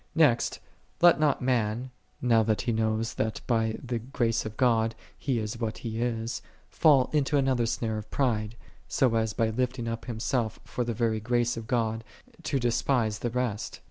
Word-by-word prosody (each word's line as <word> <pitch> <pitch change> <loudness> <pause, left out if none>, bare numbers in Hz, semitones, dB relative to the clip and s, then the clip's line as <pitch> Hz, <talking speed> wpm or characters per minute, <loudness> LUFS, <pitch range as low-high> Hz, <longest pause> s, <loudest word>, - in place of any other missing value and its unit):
44. 160 -2 +7
Next 120 -2 -1 0.4
let 175 -4 +7
not 150 -3 +2
man, 125 0 0 0.3
now 115 -2 +5
that 110 -1 +1
he 120 - -1
knoweth 110 0 0
that 110 0 -1
by 115 -2 +1
the 120 -1 -2
grace 115 -2 -1
of 110 - -9
God 115 -3 +2 0.2
he 130 -4 -1
is 110 +1 -3
what 110 -2 -2
he 115 0 -3
is, 120 0 -2 0.3
fall 140 -5 +4
into 145 -1 +2
another 130 -4 +2
snare 110 -1 -1
of 105 - -10
pride, 110 -5 0 0.3
so 130 -4 +2
as 110 -1 +1
by 115 -1 +1
lifting 125 0 -1
up 115 0 -4
himself 115 -1 -1
for 125 - -3
the 120 -1 -3
very 115 -2 +1
grace 120 +2 +1
of 115 -1 -7
God 115 -2 0 0.4
to 150 -3 -1
de 120 -2 +1
spise 115 -4 +1
the 120 - -1
rest. 120 -3 -2
115 Hz, 185 wpm, -28 LUFS, 110-125 Hz, 0.4 s, 44